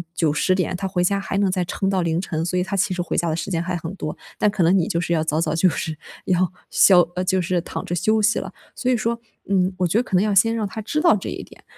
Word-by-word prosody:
9、10 165 +3 +1
点， 185 0 -1
他 195 +1 -3
回 180 -1 0
家 200 +2 +1
还 195 0 -3
能 200 -2 +2
再 185 -1 0
撑 195 +2 -2
到 190 -2 +1
凌 165 0 0
晨。 165 -3 -3
所 180 +1 -1
以 180 - +2
他 190 +2 -4
其 190 0 +1
实 180 - -2
回 175 - -3
家 170 -1 +1
的 155 - 0
时 170 - -4
间 165 -2 0
还 180 +1 -3
很 165 +1 -5
多， 155 - -5 0.2
但 210 - +3
可 200 -3 0
能 175 +4 +4
你 170 - +1
就 170 - -1
是 175 - -3
要 160 - +2
早 160 +1 0
早 155 -2 0
就 175 +3 +3
是 160 -1 -4 0.3
要 185 0 +1 0.2
消 185 -3 +6
呃， 180 - -1
就 185 0 +2
是 175 0 0
躺 - - -6
着 175 - -4
休 215 +5 +2
息 215 +2 +2
了。 - - -7 0.2
所 255 - -2
以 - - +3
说， 230 +1 -1 0.3
嗯， 185 -1 +2
我 180 -1 +1
觉 200 - +1
得 245 - +3
可 190 - -3
能 180 - +4
要 210 -1 +1
先 225 +4 +4
让 220 - -1
他 220 - -7
知 300 +9 -2
道 340 -6 +5
这 195 - -5
一 - - -6
点， - - -17
185 Hz, 320 characters per minute, -22 LUFS, 170-200 Hz, 0.3 s, 消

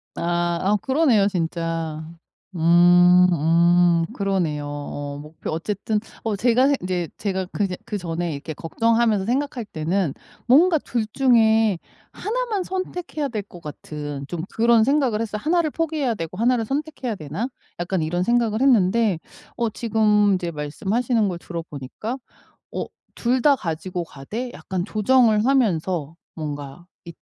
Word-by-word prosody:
아, 175 0 0
아 205 +3 +2
그러네요 260 -8 +3
진짜. 165 -3 -2 0.5
음 175 +2 +6
음 170 +1 +4
그러네요. 180 - -1
어 145 0 -6
목표 155 +1 -8
어쨌든 205 +5 -2 0.2
어 220 -2 -1
제가 245 +5 +3
생 285 - +3
인제 180 -3 -2
제가 190 -2 -2
그냥 195 -3 -1
그전에 175 -4 -3
이렇게 155 +3 -6
걱정하면서 225 +4 +1
생각할 255 -1 -1
때는 165 -2 -1 0.3
뭔가 320 +7 +6
2 235 -5 -2
중에 225 -6 +4 0.3
1 - - -2
만 420 -6 -2
선택해야 360 -5 -4
될 220 -5 -3
것 175 -3 -13
같은 145 -1 -7
좀 175 -2 -4
그런 230 0 +4
생각을 270 -5 +2
했어요. 210 -2 -3
'1를 330 0 +2
포기해야 310 -6 -1
되고 165 0 -6
1를 235 0 +2
선택해야 275 -4 -3
되나?' 160 - -4 0.3
약간 175 +1 -1
이런 175 +3 -1
생각을 235 +1 +1
했는데 220 -6 +3 0.4
어 235 -1 0
지금 210 -2 +2
이제 175 -2 -3
말씀하시는 205 - -1
걸 175 -2 -3
들어보니까 170 - -6 0.6
어 - - -2 0.3
2 250 +2 +1
다 285 +2 +5
가지고 175 -1 -4
가되 205 - -6
약간 185 -2 -4
조정을 215 0 +3
하면서 180 - +1 0.2
뭔가 145 +1 -6 0.2
이 170 - -10
200 Hz, 275 characters per minute, -23 LUFS, 170-235 Hz, 0.6 s, 음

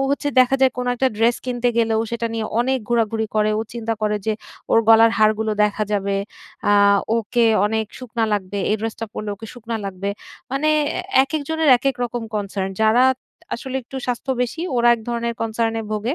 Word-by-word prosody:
হচ্ছে 285 +1 0
দেখা 255 +1 +4
যায় 265 -1 +4
কোনো 250 0 -1
একটা 265 +2 +2
dress 230 +2 +3
কিনতে 245 -1 0
গেলে 225 -1 +2
ও - - +1
সেটা 235 0 -2
নিয়ে 225 -1 -2 0.2
অনেক 260 +2 +1
ঘোরাঘুরি 225 -2 +1
করে। 215 0 +2
ও - - 0
চিন্তা 230 -1 -2
করে 210 0 +1
যে 220 - +2 0.4
ওর - - +5
গলার 225 0 +7
হাড়গুলো 215 0 +2
দেখা 210 +1 -1
যাবে, 200 -1 0 0.5
আ - - +5 0.4
ওকে 230 +1 +1 0.2
অনেক 220 0 -1
শুকনা 235 -3 -2
লাগবে, 200 -1 -2
এই 215 - +2
dress 225 0 -3
টা 225 - -3
পড়লে 215 -1 -5
ওকে 225 +3 -10
শুকনা 235 -1 -5
লাগবে। 195 0 -3 0.4
মানে 275 +4 0 0.5
অ্যা 265 - +7
একেকজনের 310 +2 -1
একেক 270 +2 0
রকম 240 0 -4
concern। 195 -2 -2
যারা 220 +4 +5 0.5
আসলে 260 +2 -5
একটু 255 +3 -10
স্বাস্থ্য 250 +2 -2
বেশি, 250 +6 -4 0.2
ওরা 240 0 +4
এক 235 - -8
ধরনের 235 0 -2
concern 225 0 -1
এ - - -5
ভোগে। 220 +6 -1
230 Hz, 195 wpm, -21 LUFS, 215-245 Hz, 0.5 s, গলার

